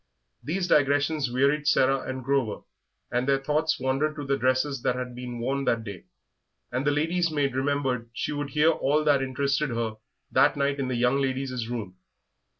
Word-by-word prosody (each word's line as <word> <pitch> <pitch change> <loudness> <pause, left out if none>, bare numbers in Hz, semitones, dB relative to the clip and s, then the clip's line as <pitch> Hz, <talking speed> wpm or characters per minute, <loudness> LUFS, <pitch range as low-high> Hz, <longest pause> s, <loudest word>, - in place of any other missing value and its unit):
These 175 +7 -1
digressions 145 -1 +2
wearied 140 +4 +1
Sarah 135 -1 +4
and 130 0 -5
Grover, 130 -5 0 0.5
and 125 +2 0
their 140 -1 +4
thoughts 150 +3 0
wandered 135 +4 0
to 145 -2 -5
the 140 0 +1
dresses 130 +2 0
that 125 - +1
had 125 -1 -5
been 125 0 -6
worn 135 +4 -1
that 115 -2 +1
day, 100 -5 -8 0.7
and 130 +4 -1
the - - +6
lady's 165 +4 +1
maid 145 -4 0
remembered 130 -3 -1
she 120 - -3
would 145 -1 -3
hear 150 +3 +4
all 150 0 +1
that 145 -3 +3
interested 140 +3 0
her 115 -2 -2 0.3
that - - +4
night 140 0 0
in 135 - -1
the 130 - -1
young 125 +3 +2
ladies' 130 -3 -2
rooms. 110 -6 -4
135 Hz, 180 wpm, -26 LUFS, 125-145 Hz, 0.7 s, the